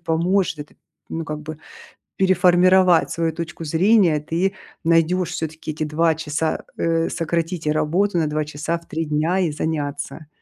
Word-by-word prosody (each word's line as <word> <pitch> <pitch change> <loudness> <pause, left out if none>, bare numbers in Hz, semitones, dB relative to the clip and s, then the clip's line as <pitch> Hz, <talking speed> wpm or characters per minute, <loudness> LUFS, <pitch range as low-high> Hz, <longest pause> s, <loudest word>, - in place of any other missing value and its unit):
поможет, 165 -2 0 0.4
ну, 165 0 -4
как 150 -1 -5
бы 155 0 -7 0.6
переформировать 185 -1 +4
свою 165 -1 -1
точку 165 0 -6
зрения, 175 +1 +4
и - - -2
ты 170 +6 -1 0.3
найдешь 165 +2 +2
все-таки 160 -2 -4
эти 155 0 -3
2 160 +2 +2
часа, 160 0 -2
э, 165 0 +1
сократить 165 0 -2
работу 170 +5 +1
на 160 - +1
2 150 0 -1
часа 155 +3 -3
в 170 - -18
3 160 +1 -3
дня 155 +5 0
и 180 -4 +1
заняться. 150 0 -4
165 Hz, 150 wpm, -21 LUFS, 155-175 Hz, 0.6 s, переформировать